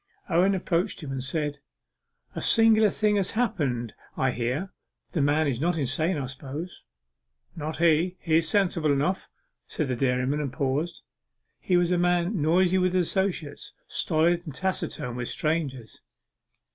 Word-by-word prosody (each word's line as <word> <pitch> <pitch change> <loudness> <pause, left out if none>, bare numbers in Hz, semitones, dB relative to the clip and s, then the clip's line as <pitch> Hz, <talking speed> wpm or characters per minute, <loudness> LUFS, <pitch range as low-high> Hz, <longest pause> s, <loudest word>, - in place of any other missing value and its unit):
Owen 185 +3 +3
approached 180 0 -1
him 140 - -5
and 135 -1 -3
said 150 +1 -2 0.7
'A - - -5
singular 220 -1 +5
thing 210 +1 +1
has 190 -2 0
happened, 145 - -1 0.2
I 130 -1 +2
hear. 125 +11 -2 0.4
The 160 - 0
man 145 +3 +3
is 135 -3 -1
not 170 +1 +1
insane, 155 +5 0
I 140 - -2
suppose?' 140 +6 -7 0.7
'Not 155 0 -4
he 170 +2 +2
he's 160 -1 +2
sensible 175 -6 +2
enough,' 150 +7 0 0.4
said 150 -4 -3
the 125 - 0
dairyman, 130 +3 0
and 140 -3 -3
paused. 140 +4 -2 0.6
He 180 - +2
was 175 0 +2
a 180 - +2
man 175 +1 +1
noisy 180 +4 +3
with 185 0 +1
his 180 -1 +3
associates 180 -7 -2
stolid 170 +1 +1
and 145 - -7
taciturn 130 -8 -2
with 120 -1 -3
strangers. 140 -8 -2
160 Hz, 150 wpm, -26 LUFS, 140-180 Hz, 0.7 s, singular